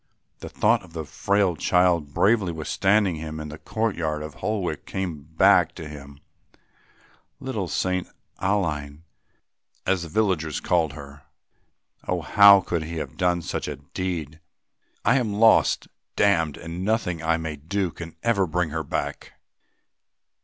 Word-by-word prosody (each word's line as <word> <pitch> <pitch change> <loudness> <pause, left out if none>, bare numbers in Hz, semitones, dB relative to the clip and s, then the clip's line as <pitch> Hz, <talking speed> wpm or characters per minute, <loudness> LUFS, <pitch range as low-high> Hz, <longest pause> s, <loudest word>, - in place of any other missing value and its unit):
The - - -8
thought 115 +1 +2
of 90 -4 -16
the 80 -2 -5
frail 100 +3 +1
child 85 -4 +2
bravely 100 +1 +2
withstanding 95 +3 +1
him 80 0 -6
in 75 0 -6
the 75 +1 -9
courtyard 80 -5 -2
of 75 -1 -7
Holwick 95 -7 -3
came 90 -6 -4 0.2
back 90 -3 +5
to 80 -3 -7
him, 70 -1 -11 1.2
"little - - -3
St. 90 -1 -1 0.3
Aline," 80 -7 -1 0.8
as 95 -2 +1
the 85 - -6
villagers 85 -6 0
called 80 -4 +1
her. 70 -1 -11 0.9
Oh! 90 -1 0
how 100 +4 +7
could 85 -2 -2
he 85 +1 -6
have 80 - -5
done 90 -1 +1
such - - -3
a 75 - -4
deed? 80 +1 -5 0.7
"I - - +5
am 110 -6 -1
lost, 110 +1 +4 0.3
damned, 80 -8 +2
and 85 +2 -6
nothing 95 -6 0
I 80 0 +1
may 80 -2 -4
do 90 +5 -2
can 85 0 -9
ever 100 -5 +2
bring 85 0 -1
her 80 +1 -2
back. - - -4
85 Hz, 145 wpm, -24 LUFS, 80-95 Hz, 1.2 s, how